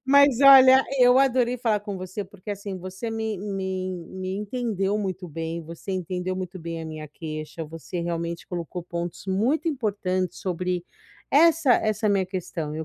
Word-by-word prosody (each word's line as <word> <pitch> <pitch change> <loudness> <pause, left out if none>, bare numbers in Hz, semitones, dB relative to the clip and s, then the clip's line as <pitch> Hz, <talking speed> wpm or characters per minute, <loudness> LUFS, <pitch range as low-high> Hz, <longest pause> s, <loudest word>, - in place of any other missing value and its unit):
Mas 280 -1 +5
olha, 265 -1 +9
eu 250 +1 +6
adorei 250 -2 +3
falar 225 -4 +1
com 205 -2 -5
você, 185 +2 -5
porque 200 +1 -10
assim, 200 -1 -5
você 190 +5 -6
me 220 -1 -2
me 195 -1 -4 0.3
en 175 -2 -7
me 185 +1 -3
entendeu 210 -2 -1
muito 185 -3 -4
bem, 165 +2 -4
você 165 +4 -8
entendeu 185 0 -3
muito 185 0 -5
bem 165 -1 -5
a 160 - -6
minha 155 -1 -7
queixa, 155 +1 -6
você 165 +3 -6
realmente 170 0 -3
colocou 175 0 -5
pontos 175 +1 -5
muito 240 - +1
importantes 195 - -1
sobre 180 -1 -2 0.5
essa 320 -3 +5
essa 215 0 +1
minha 195 -2 +2
questão. 170 -5 -4
Eu 160 0 -4
190 Hz, 170 wpm, -25 LUFS, 170-225 Hz, 0.5 s, olha